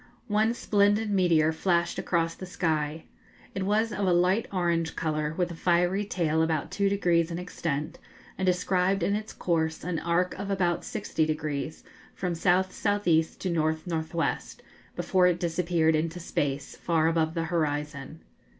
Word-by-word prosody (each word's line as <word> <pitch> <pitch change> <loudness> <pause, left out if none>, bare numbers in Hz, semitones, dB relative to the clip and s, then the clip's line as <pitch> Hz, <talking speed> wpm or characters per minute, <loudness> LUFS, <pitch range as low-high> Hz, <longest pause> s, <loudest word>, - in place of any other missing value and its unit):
One 215 +3 +2
splendid 205 0 +2
meteor 170 -5 +3
flashed 170 +1 0
across 165 -1 0
the 185 - -9
sky. 160 -3 -1 0.5
It 195 - -3
was 220 +2 +2
of 200 -1 -1
a - - +4
light 180 +5 +2
orange 170 -3 0
colour, 155 -1 -1
with 180 -1 0
a - - -6
fiery 180 +4 +1
tail 160 -5 0
about 160 -2 0
two 200 -1 +1
degrees 175 -4 +2
in 170 - -4
extent, 165 -4 -4 0.4
and 190 - -4
described 185 +1 +1
in 200 - +1
its 215 +1 -4
course 160 -2 -1
an 170 -1 -2
arc 175 +2 +1
of 200 - -4
about 180 -3 0
sixty 160 - -2
degrees, 155 -1 -3 0.3
from 180 -2 -2
S.S.E. 185 0 +2
to 185 - -3
N.N.W., 160 0 0 0.6
before 185 -1 +3
it 175 -1 +1
disappeared 170 -1 +1
into 165 +3 -1
space, 140 -4 -2
far 165 -2 +1
above 160 0 +1
the 165 - 0
horizon. 150 -1 -2
170 Hz, 150 wpm, -27 LUFS, 160-185 Hz, 0.6 s, a